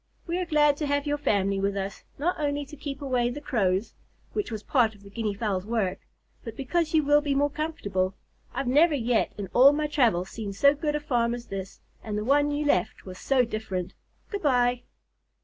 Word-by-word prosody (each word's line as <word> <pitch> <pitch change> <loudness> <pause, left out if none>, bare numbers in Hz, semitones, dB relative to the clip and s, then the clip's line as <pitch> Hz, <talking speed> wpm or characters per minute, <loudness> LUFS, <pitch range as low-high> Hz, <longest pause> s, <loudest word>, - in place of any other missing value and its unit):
We 345 +1 -2
are 365 - -2
glad 295 -2 +4
to 300 - -2
have 285 0 0
your 290 0 -1
family 195 -6 +1
with 200 0 0
us, 195 0 -4
not 340 +5 -1
only 290 -1 -1
to 285 - -11
keep 285 -1 -6
away 250 -3 +1
the 245 - -5
Crows 205 -8 0 0.4
(which 415 - -2
was 215 -2 -5
part 230 -5 +2
of 200 - -19
the 200 - -13
Guinea 215 -1 -2
Fowls' 200 -3 -1
work), 210 -4 -1 0.4
but 225 -3 -8
because 315 +4 0
you 310 - +4
will 290 +1 +4
be 285 -2 -1
more 285 +1 +2
comfortable. 200 - -2 0.4
I've 270 +2 -3
never 295 +5 +4
yet 240 -3 +1
in 205 - -4
all 270 +3 +7
my 300 +1 0
travels 230 - +1
seen 210 -3 -5
so 280 +8 +5
good 295 0 -2
a - - 0
farm 240 -5 0
as 240 0 -9
this, 195 -1 -7 0.2
and 210 -1 -3
the 210 - -2
one 290 +3 +3
you 295 +1 -1
left 180 -11 0
was 185 -1 -9
so 260 -2 +2
different! 195 -5 -4 0.4
Good 405 -2 -3
bye." 245 -4 +2
250 Hz, 215 wpm, -27 LUFS, 205-290 Hz, 0.4 s, all